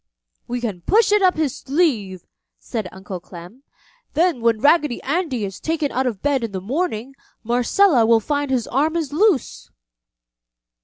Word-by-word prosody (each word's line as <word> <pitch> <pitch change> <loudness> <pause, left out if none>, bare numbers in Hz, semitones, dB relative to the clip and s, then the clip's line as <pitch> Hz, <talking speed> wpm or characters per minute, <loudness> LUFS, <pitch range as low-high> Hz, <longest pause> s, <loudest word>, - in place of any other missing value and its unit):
"We 245 0 -3
can 205 -7 -4
push 430 - +3
it 420 0 +4
up 370 -3 +3
his 300 -5 0
sleeve!" 245 - -1 0.3
said 220 -6 -5
Uncle 190 -1 -8
Clem. 175 +8 -12 0.5
"Then 330 -5 +2
when 230 -1 +2
Raggedy 295 -2 +3
Andy 280 - -1
is 195 -1 -7
taken 315 -3 -1
out 260 0 0
of 215 -6 -4
bed 280 -3 +1
in 225 -3 -4
the 190 - -3
morning, 265 - -3 0.3
Marcella 245 - +3
will 230 0 +5
find 285 +4 -2
his 250 -4 0
arm 300 +6 0
is 315 -4 -2
loose!" 305 - +1
260 Hz, 160 wpm, -21 LUFS, 220-315 Hz, 0.5 s, will